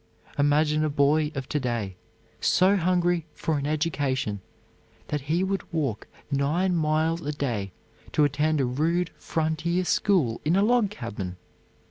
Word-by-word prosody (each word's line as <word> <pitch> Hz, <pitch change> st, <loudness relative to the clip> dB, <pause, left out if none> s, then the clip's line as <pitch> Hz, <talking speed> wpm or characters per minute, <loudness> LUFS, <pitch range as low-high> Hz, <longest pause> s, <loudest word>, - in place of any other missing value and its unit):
Imagine 150 Hz, +1 st, +2 dB
a 155 Hz, -, +1 dB
boy 150 Hz, +1 st, +2 dB
of 135 Hz, -1 st, -4 dB
to 150 Hz, -, 0 dB
day, 115 Hz, -7 st, -2 dB, 0.4 s
so 190 Hz, +2 st, +4 dB
hungry 175 Hz, -2 st, +1 dB
for 155 Hz, -3 st, -1 dB
an 140 Hz, -, -3 dB
education 140 Hz, -, -1 dB, 0.7 s
that 150 Hz, -1 st, -1 dB
he 160 Hz, +7 st, 0 dB
would 195 Hz, 0 st, -1 dB
walk 145 Hz, -, -2 dB, 0.2 s
nine 160 Hz, +7 st, +1 dB
miles 160 Hz, +1 st, +1 dB
a 150 Hz, -, -2 dB
day 120 Hz, -10 st, -3 dB, 0.4 s
to 150 Hz, -, +3 dB
attend 150 Hz, +2 st, +1 dB
a 135 Hz, -, +2 dB
rude 165 Hz, +7 st, 0 dB
frontier 165 Hz, +3 st, -1 dB
school 165 Hz, -, +2 dB
in 155 Hz, +4 st, +2 dB
a 195 Hz, -, +4 dB
log 235 Hz, -2 st, +3 dB
cabin! 105 Hz, -, -6 dB
155 Hz, 145 wpm, -26 LUFS, 140-170 Hz, 0.7 s, so